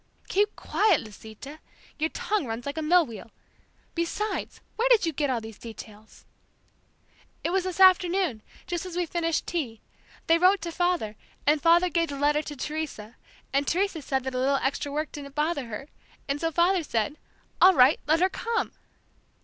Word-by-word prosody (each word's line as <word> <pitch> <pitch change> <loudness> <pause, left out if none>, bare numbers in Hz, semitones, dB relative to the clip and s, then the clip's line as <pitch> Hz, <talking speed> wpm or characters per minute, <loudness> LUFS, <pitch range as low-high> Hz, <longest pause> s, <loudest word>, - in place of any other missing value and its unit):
"Keep 415 +2 +1
quiet, 410 -7 +2
Lisita. 220 +7 -11 0.4
Your 315 +1 +1
tongue 415 -7 -2
runs 225 +1 -5
like 285 +3 -3
a - - -2
mill 340 +2 +4
wheel. 230 -3 -10 0.6
Besides, 345 +6 -3 0.2
where 475 +3 +1
did 470 -7 +5
you 325 - -1
get 290 0 0
all 250 -2 0
these 220 -1 -10
details?" 220 -2 -12 1.2
"It 335 - 0
was 375 0 +1
this 370 -1 -4
afternoon, 365 - +4 0.2
just 345 -1 -3
as 365 -2 -7
we 355 - +1
finished 330 -1 -1
tea. 260 -11 -3 0.5
They 330 0 +4
wrote 375 +3 +5
to 335 0 -4
father, 345 - -1 0.3
and 295 0 +3
father 340 +2 +5
gave 335 -1 0
the 280 - -5
letter 295 +1 +2
to 300 -1 -7
Teresa, 280 -6 -5 0.4
and 280 +1 +1
Teresa 365 -2 0
said 265 -1 -1
that 265 0 -4
a 255 - -1
little 275 +2 +2
extra 275 +1 -1
work 300 +1 -2
didn't 280 -2 -9
bother 300 -3 -1
her, 230 +5 -7 0.4
and 280 +1 -2
so 330 0 0
father 350 +3 +3
said, 290 0 -2 0.4
'All 375 0 +8
right, 260 +2 +6
let 320 +3 +3
her 370 - +4
come!'" 460 +4 -2
310 Hz, 180 wpm, -27 LUFS, 270-355 Hz, 1.2 s, All